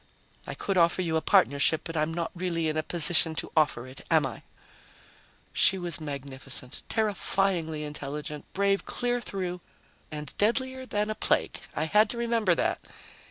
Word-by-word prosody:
I - - -5
could 195 -2 0
offer 170 +2 +3
you 165 -2 -1
a 160 - +2
partnership, 160 -5 +3
but 165 - -6
I'm 155 +1 0
not 170 0 -3
really 175 -2 -2
in 155 - -1
a 155 - +1
position 165 0 +5
to - - -3
offer 150 -6 +2
it, 130 +1 -10
am 160 -4 +4
I?" 130 - -6 1.1
She 190 - +4
was 175 -3 +1
magnificent, 135 -3 -6
terrifyingly 195 -7 0
intelligent, 150 0 -6
brave 200 0 +1
clear 245 0 -2
through... 180 -4 -4 0.5
and 150 -1 -7
deadlier 260 +4 0
than 210 -1 -1
a - - 0
plague. - - 0 0.2
I - - 0
had 210 +7 +3
to 240 - -2
remember 230 -6 +2
that. - - 0
170 Hz, 160 wpm, -28 LUFS, 150-200 Hz, 1.1 s, position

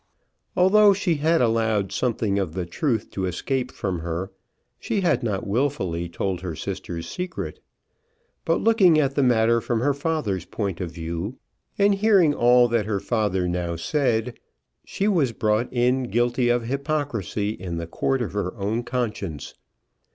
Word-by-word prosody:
Although 200 +3 +6
she 180 -5 0
had 160 +2 +2
allowed 110 -4 +1
something 110 -5 0
of 90 -5 -2
the 90 -2 -2
truth 110 - -2
to 95 -1 -2
escape 125 +8 -2
from 95 -3 -3
her, 85 +3 -4 0.5
she 205 - -1
had 165 -9 +2
not 105 -5 -2
wilfully 100 - -1
told 90 +1 -3
her 90 -4 -4
sister's 85 +2 -5
secret. 180 0 -5 0.8
But - - +1
looking 195 -8 +5
at 140 -2 +1
the 140 - +1
matter 115 -2 +3
from 115 -1 -1
her 140 +3 +2
father's 140 - -2
point 100 -5 -4
of 90 - -3
view, 85 +7 -5 0.4
and 200 0 +4
hearing 195 -6 +4
all 120 -1 +5
that 115 -3 0
her 105 -2 0
father 100 -4 0
now 85 -1 -2
said, 115 - -1 0.4
she 200 - -2
was 155 - +2
brought 110 +2 0
in 125 +1 +1
guilty 120 +1 +1
of 120 -1 +2
hypocrisy 130 - -2
in 90 -5 -5
the 85 - -3
court 130 +9 -1
of 105 - -5
her 100 -2 -2
own 105 +4 -1
conscience. 105 - -4
115 Hz, 160 wpm, -24 LUFS, 95-140 Hz, 0.8 s, Although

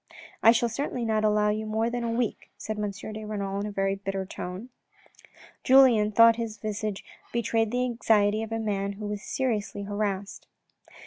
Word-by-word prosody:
" - - -21
I 225 - +8
shall 235 0 +2
certainly 245 0 -3
not 215 -1 +1
allow 210 0 +3
you 215 +1 -2
more 220 +1 0
than 240 0 -2
a 235 - -1
week," 230 -1 -2
said 215 -1 -5
M. 210 -1 -1
de 215 +2 -7
Renal 200 -2 -3
in 205 - -3
a - - -5
very 195 -1 0
bitter 195 -1 -4
tone. 185 +6 -7 0.9
Julien 250 -5 +6
thought 230 +1 +6
his 225 -2 -4
visage 210 -1 -4 0.3
betrayed 225 -1 0
the 250 +2 0
anxiety 220 -3 +2
of 225 0 -6
a 225 - -1
man 200 -2 -2
who 210 +1 -7
was 205 -1 -4
seriously 210 -6 -2
harassed. 205 -1 -3
215 Hz, 185 wpm, -27 LUFS, 205-230 Hz, 0.9 s, I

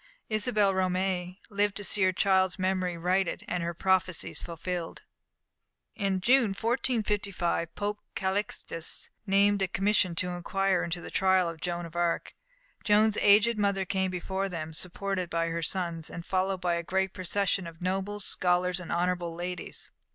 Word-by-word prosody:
Isabelle 215 -2 +2
Romée 185 -1 0
lived 205 0 +1
to 205 - -4
see 205 +2 +1
her 185 0 +5
child's 190 0 +2
memory 185 -2 0
righted 180 +2 0
and 180 - -1
her 170 0 -3
prophecies 185 -1 +1
fulfilled. 170 0 -5 0.9
In 195 -3 -1
June, 235 -2 +4
1455, 210 -8 0
Pope 205 0 -2 0.2
Calixtus, 190 -4 -2 0.2
named 200 +1 +4
a 190 - +2
commission 195 -2 +1
to 180 +2 0
inquire 185 +1 0
into 170 +1 -3
the - - -8
trial 190 -1 +3
of 165 -1 -6
Joan 175 -1 -2
of 165 0 -11
Arc. 170 -1 0 0.5
Joan's 215 0 +4
aged 215 +2 +5
mother 200 -2 +1
came 190 0 0
before 190 +2 -2
them, 160 -3 -5
supported 185 +2 -3
by 165 0 0
her 165 0 -2
sons, 170 -1 -2
and 170 -1 -7
followed 190 0 0
by 175 -1 +1
a 170 - 0
great 190 +2 -1
procession 190 0 0
of 165 -1 -11
nobles, 195 +3 -2
scholars, 180 0 +2
and 180 - -7
honourable 175 -1 0
ladies. 180 0 -5
185 Hz, 155 wpm, -29 LUFS, 175-200 Hz, 0.9 s, her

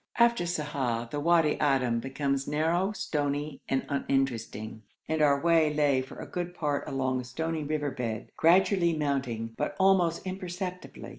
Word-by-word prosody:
After 235 -7 +4
Sa'ah 140 -8 -2
the 145 - -2
Wadi 165 -1 +3
Adim 130 -5 +2
becomes 135 +1 -2
narrow, 165 +6 +1
stony, 145 -6 -2
and 135 - 0
uninteresting, 130 -6 -2 0.3
and 160 0 0
our 140 -2 +4
way 165 -1 +3
lay 145 -3 +2
for 130 - -10
a - - -6
good 175 0 -4
part 145 -4 -1
along 130 -1 -1
a - - -9
stony 160 +5 -3
river 145 -1 -1
bed, 115 -5 -4
gradually 170 0 +4
mounting, 130 -6 -2
but - - -2
almost 190 -3 +3
imperceptibly. 185 -1 -6
150 Hz, 150 wpm, -28 LUFS, 135-170 Hz, 0.3 s, After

